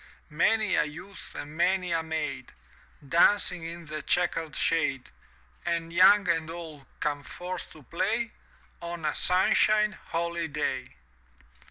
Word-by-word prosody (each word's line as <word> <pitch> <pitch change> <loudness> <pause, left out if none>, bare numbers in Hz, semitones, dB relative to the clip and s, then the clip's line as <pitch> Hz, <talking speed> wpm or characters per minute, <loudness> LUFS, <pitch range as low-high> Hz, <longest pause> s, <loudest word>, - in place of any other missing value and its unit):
— - - -34 0.2
many 220 -3 +1
a - - +4
youth 180 +6 -10
and 150 +1 -7
many 180 +1 +1
a 165 -1 +1
maid^ 160 -5 -3 0.6
Dancing 175 +2 +3
in 170 +1 -7
the 155 0 -5
chequered 165 -3 0
shade, 140 -5 0 0.5
And 170 -1 -2
young 200 +3 +6
and 165 -2 +1
old 160 -5 -8
come 145 -1 -1
forth 180 +4 -7
to 155 - -15
play 215 - -1 0.5
On 170 -1 -5
a 150 - +1
sunshine 210 +3 +3
holiday. 165 - -3
170 Hz, 130 wpm, -28 LUFS, 155-185 Hz, 0.6 s, young